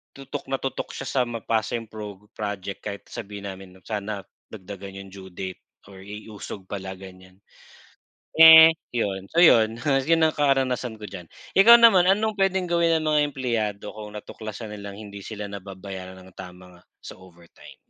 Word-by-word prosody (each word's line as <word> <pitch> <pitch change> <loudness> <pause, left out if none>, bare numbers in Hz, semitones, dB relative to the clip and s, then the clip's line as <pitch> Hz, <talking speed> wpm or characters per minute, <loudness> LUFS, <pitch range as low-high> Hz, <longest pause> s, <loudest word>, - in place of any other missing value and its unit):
tutok 135 -1 -7
na 135 - +1
tutok 135 -1 -4
siya - - -6
sa 130 - +1
mapasa 115 -1 -2
'yong 115 - -11
prog 105 -2 -9
project 100 -2 -5
kahit 100 -1 -6
na - - -21
sabihin 100 0 -9
namin, 95 0 -10
'no, 95 - -24
sana 105 -1 -4 0.3
dagdagan 100 -1 -9
'yong 95 -1 -11
due 95 -1 -11
date 95 0 -7 0.3
or 95 -1 -13
i-usog 105 -1 -9
pala, 95 -1 -5
ganyan. 95 0 -14 1.0
Eh, 160 0 +11 0.2
'yon, 95 -5 -2
so 170 - +4
'yon, 115 -8 +5
'yon 150 +3 +2
ang 160 - +4
karanasan 130 -4 +1
ko - - -8
diyan. 90 -3 -9 0.3
Ikaw 230 +5 +9
naman, 190 -6 +7
anong 210 +2 +1
puwedeng 190 -2 +1
gawin 170 -1 +3
ng 155 - -4
mga 150 -1 +3
empleyado 115 -7 -3
kung 105 -1 -9
natuklasan 110 +1 -8
nilang 100 -1 -8
hindi 100 -2 -9
sila 105 -2 -6
nababayaran 95 -1 -8
ng 95 0 -16
tama 90 -1 -10
nga, - - -24 0.2
sa - - -10
overtime? 85 -2 -16
105 Hz, 170 wpm, -24 LUFS, 95-135 Hz, 1.0 s, Eh